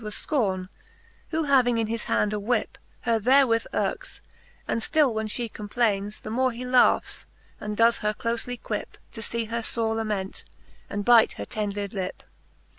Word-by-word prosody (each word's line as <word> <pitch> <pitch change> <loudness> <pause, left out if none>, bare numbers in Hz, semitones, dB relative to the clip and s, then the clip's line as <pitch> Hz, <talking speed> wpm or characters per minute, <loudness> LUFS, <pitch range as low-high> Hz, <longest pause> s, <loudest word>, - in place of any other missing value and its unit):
Was 210 -1 -5
Scorne^ 195 - -1 0.6
who 320 0 0
having 255 -5 +4
in 225 - +1
his 225 +1 -3
hand 210 0 +1
a 210 - -1
whip, 225 +2 -1 0.2
Her 230 -2 +1
therewith 245 -1 +4
yirks, - - -2 0.5
and 230 - 0
ftill 295 0 +2
when 220 0 -2
fhe 230 +1 -3
complaines. 210 -1 -1
The 215 - -5
more 255 +2 +2
he 245 +2 -6
laughs, 250 0 +3 0.3
aud 210 0 -3
does 230 +2 +4
her 210 -1 +1
clofely 235 +2 -3
quip. - - -5
To 225 - -8
fee 230 +1 -3
her 230 +1 -3
fore 225 0 -1
lament, 210 -4 -3 0.5
and 205 0 -3
bite 240 -2 +6
her - - -6
tender 205 -1 -3
lip. 190 -2 -5
225 Hz, 170 wpm, -26 LUFS, 210-245 Hz, 0.6 s, bite